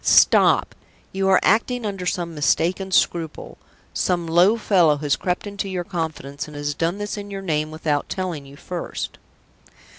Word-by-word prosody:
Stop! - - +5 0.4
you 195 0 0
are 190 - +6
acting 230 +3 +2
under 195 -3 -3
some 175 -1 -2
mistaken 170 +5 +1
scruple. 165 -3 0 0.3
Some 175 -2 0
low 175 +7 +4
fellow 175 -9 +3
has 145 -1 +1
crept 180 +2 -2
into 200 -1 -4
your 180 -2 -2
confidence, 160 -7 -4
and 150 -1 -10
has 145 0 -2
done 165 +5 -1
this 205 0 -4
in 205 0 -7
your 195 -1 -6
name 155 -4 -1
without 155 -2 -2
telling 180 -6 -3
you 140 - -13
first." 175 +4 -6
175 Hz, 160 wpm, -22 LUFS, 155-195 Hz, 0.4 s, are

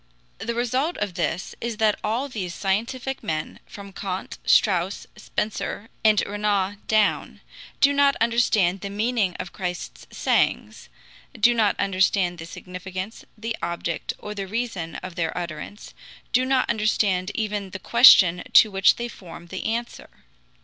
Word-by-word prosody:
The 235 0 -3
result 255 +8 0
of 205 -3 -3
this 175 0 -2
is 230 -2 -3
that 215 -1 +2
all 235 +6 -1
these 185 -9 -5
scientific 240 +7 -2
men, 155 -1 -4
from 200 -1 -11
Kant, 190 -1 -5
Strauss, 190 -2 +2
Spencer, 215 +1 -4
and 215 -2 +5
Renan 205 -1 -1
down, 215 -1 +1 0.4
do 285 0 +5
not 280 0 +4
understand 220 -6 +2
the 200 - -4
meaning 210 -2 0
of 185 -1 -6
Christ's 180 -2 -6
sayings, - - 0 0.5
do 235 +3 +5
not 220 -3 +1
understand 185 -2 +1
the 165 - -7
significance, 185 +4 -7
the 225 +1 -3
object, 170 -1 -3
or 210 - -7
the 200 -2 -5
reason 205 -6 -3
of 185 -1 -6
their 165 0 -2
utterance, 170 +3 -7 0.4
do 255 +1 +3
not 260 -1 +2
understand 210 -4 +1
even 210 -3 -2
the 190 - -6
question 190 -5 +7
to 215 - +7
which 195 0 +4
they 240 - -4
form 175 -6 -11
the 190 - -6
answer. 235 +2 -3
205 Hz, 145 wpm, -24 LUFS, 185-230 Hz, 0.5 s, question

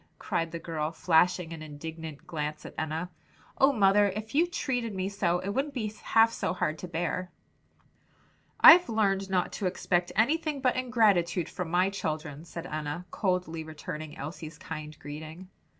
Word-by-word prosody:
cried 165 0 -2
the 170 - -4
girl, 160 -2 -3
flashing 170 0 +2
an 160 - -8
indignant 155 0 -8
glance 150 -2 -4
at - - -8
Enna. 160 +3 -3 0.5
"Oh, 270 +1 +6
mother, 205 -3 +4
if 215 +3 -6
you 330 +5 +4
treated 245 - -2
me 190 0 -1
so, 185 -4 +1
it 185 - -4
wouldn't 275 +7 -2
be 215 -4 -2
half 225 0 +4
so - - -2
hard 155 -3 -1
to 180 - -6
bear!" 175 +2 -2 1.3
"I've 355 0 +9
learned 195 -3 +1
not 185 -2 +1
to 195 - -2
expect 175 -1 0
anything 300 +6 +1
but 255 -2 +2
ingratitude 210 -9 +2
from 180 -3 -5
my 180 +3 +2
children," 155 -4 -4
said 170 0 -7
Enna, 155 +1 -4
coldly 180 -4 -1
returning 155 0 -7
Elsie's 155 +1 -7
kind 155 -1 -7
greeting. 155 +5 -9
180 Hz, 160 wpm, -29 LUFS, 160-210 Hz, 1.3 s, I've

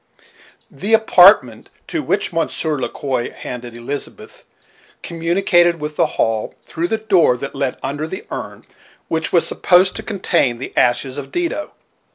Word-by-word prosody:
The 220 +3 +2
apartment 180 - +5 0.2
to - - -2
which - - -1
Monsieur 155 -1 -1
Le - - -2
Quoi 130 -5 -3
handed 120 -1 -8
Elizabeth 130 +5 -7 0.6
communicated 175 0 +2
with 150 0 -5
the - - +2
hall, 110 -1 0
through 170 +2 -3
the 220 - 0
door 190 - +3
that 140 +2 -6
led 135 -2 -2
under 145 +3 -3
the 190 +5 -7
urn - - -7 0.4
which 160 -1 -1
was 170 - +3
supposed 185 +1 +3
to - - -4
contain 175 - 0
the 130 - -8
ashes 130 +3 +1
of 140 - -9
Dido. 335 -3 -3
160 Hz, 150 wpm, -19 LUFS, 130-185 Hz, 0.6 s, apartment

